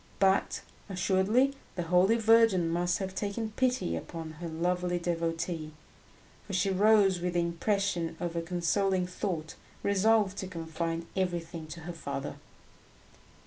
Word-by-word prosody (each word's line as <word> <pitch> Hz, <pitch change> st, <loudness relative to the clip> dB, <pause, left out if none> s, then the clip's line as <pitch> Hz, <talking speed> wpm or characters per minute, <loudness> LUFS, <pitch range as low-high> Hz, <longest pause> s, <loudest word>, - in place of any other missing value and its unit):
But, 195 Hz, 0 st, +2 dB, 0.3 s
assuredly, 195 Hz, +8 st, +2 dB, 0.2 s
the 175 Hz, -, -2 dB
Holy 180 Hz, +6 st, +4 dB
Virgin 225 Hz, -6 st, +5 dB
must 175 Hz, +1 st, +1 dB
have 190 Hz, -1 st, -4 dB
taken 210 Hz, +3 st, -3 dB
pity 250 Hz, -, 0 dB
upon 160 Hz, -, -6 dB
her 170 Hz, -, -3 dB
lovely 175 Hz, +2 st, 0 dB
devotee, 165 Hz, -2 st, -2 dB, 0.7 s
for 200 Hz, -, -6 dB
she 190 Hz, +1 st, +2 dB
rose 200 Hz, -1 st, +4 dB
with 180 Hz, 0 st, -2 dB
the 175 Hz, -, +3 dB
impression 170 Hz, -1 st, -1 dB
of 175 Hz, -1 st, -3 dB
a 170 Hz, -, 0 dB
consoling 180 Hz, +2 st, +1 dB
thought, 180 Hz, -3 st, -3 dB, 0.3 s
resolved 200 Hz, 0 st, +3 dB
to 190 Hz, -, -4 dB
confide 165 Hz, -1 st, -3 dB
everything 170 Hz, -3 st, -2 dB
to 165 Hz, +2 st, -8 dB
her 175 Hz, +2 st, -6 dB
father. 140 Hz, -4 st, -5 dB
180 Hz, 135 wpm, -30 LUFS, 165-195 Hz, 0.7 s, Virgin